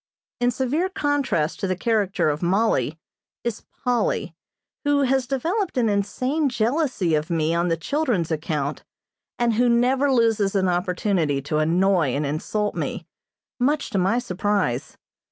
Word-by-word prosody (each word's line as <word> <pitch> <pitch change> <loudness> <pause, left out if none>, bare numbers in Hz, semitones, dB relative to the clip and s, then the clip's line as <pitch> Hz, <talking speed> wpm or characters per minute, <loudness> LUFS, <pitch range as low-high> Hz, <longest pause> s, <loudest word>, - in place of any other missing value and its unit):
In 245 0 +3
severe 270 +9 0
contrast 290 - 0
to 195 - -1
the 185 - 0
character 195 -5 +1
of 150 - -4
Mollie 175 - +1 0.5
is 235 -2 -4 0.2
Polly, 250 - 0 0.5
who 290 -1 +2
has 265 -1 +1
developed 335 - -1
an 235 -3 +3
insane 255 +9 0
jealousy 240 - 0
of 155 +2 0
me 165 -1 +1
on 170 +1 +1
the 165 -1 +1
children's 215 - -1
account, 150 -2 -2 0.5
and 240 -1 +2
who 240 +2 +3
never 255 +4 +3
loses 225 -5 +2
an 190 -1 +2
opportunity 180 -4 0
to 150 +2 -1
annoy 170 -2 +2
and 145 +1 -1
insult 205 +8 -2
me, - - -4 0.5
much 285 +2 +1
to 200 - +1
my 195 +6 +2
surprise. 200 - -1
210 Hz, 145 wpm, -23 LUFS, 170-255 Hz, 0.5 s, In